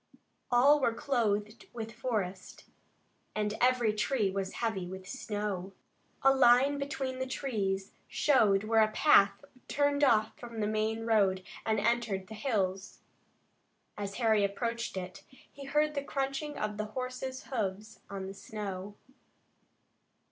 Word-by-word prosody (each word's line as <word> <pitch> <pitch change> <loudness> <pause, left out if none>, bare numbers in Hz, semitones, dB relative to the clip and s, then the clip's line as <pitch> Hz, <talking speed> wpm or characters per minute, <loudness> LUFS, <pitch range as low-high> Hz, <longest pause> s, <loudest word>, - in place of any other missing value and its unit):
All 275 +5 +6
were 235 -4 +1
clothed 215 -5 -1
with 225 -1 -6
forest, 210 -6 -4 0.7
and 210 -1 0
every 245 -3 +3
tree 215 -2 0
was 195 0 -3
heavy 220 -6 -2
with 190 0 -8
snow. 205 -5 -4 0.5
A 270 0 +7
line 265 +2 +5
between 270 -2 -3
the 260 - -2
trees 200 -8 -2 0.2
showed 215 -9 +3
where 220 +1 +3
a 215 - +5
path 200 -3 +4 0.2
turned 285 0 +1
off 220 -5 +3
from 235 -2 -8
the 210 - +1
main 215 +1 -1
road 195 -5 +2 0.2
and 220 -1 +2
entered 220 -3 0
the - - -7
hills. 200 -5 -2 0.9
As 200 -1 -5
Harry 220 -4 +3
approached 230 +2 -2
it, 185 0 -6
he 275 +1 -14
heard 300 +2 +1
the 280 -1 -2
crunching 275 +2 -3
of 210 0 -3
horses' 255 +4 -4
hoofs 215 -3 -4
in 195 -1 -5
the 190 - -6
snow. 205 -2 -6
220 Hz, 135 wpm, -31 LUFS, 200-260 Hz, 0.9 s, A